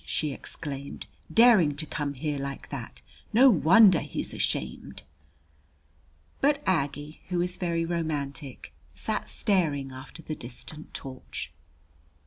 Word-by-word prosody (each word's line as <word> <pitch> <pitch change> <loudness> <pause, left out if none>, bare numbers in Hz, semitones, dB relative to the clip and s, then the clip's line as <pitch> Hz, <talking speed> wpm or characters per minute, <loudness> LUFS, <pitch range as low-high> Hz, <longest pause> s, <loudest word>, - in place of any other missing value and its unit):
she 150 -2 -2
exclaimed. 140 0 -6 0.3
"Daring 215 -11 +6
to 155 +2 -2
come 145 -1 -3
here 145 +1 -2
like 140 0 -6
that! 60 0 -7 0.3
No 255 +4 +8
wonder 190 +3 +7
he's - - -2
ashamed." 65 +1 -3 1.4
But 285 +1 +2
Aggie, 145 -3 -1
who 180 -1 0
is 180 +1 +2
very 170 -2 -1
romantic, 150 -5 -4 0.2
sat - - -1
staring 150 -9 +1
after 130 +5 -10
the 155 - -4
distant 150 +4 -9
torch. 130 - -7
150 Hz, 115 wpm, -27 LUFS, 140-180 Hz, 1.4 s, No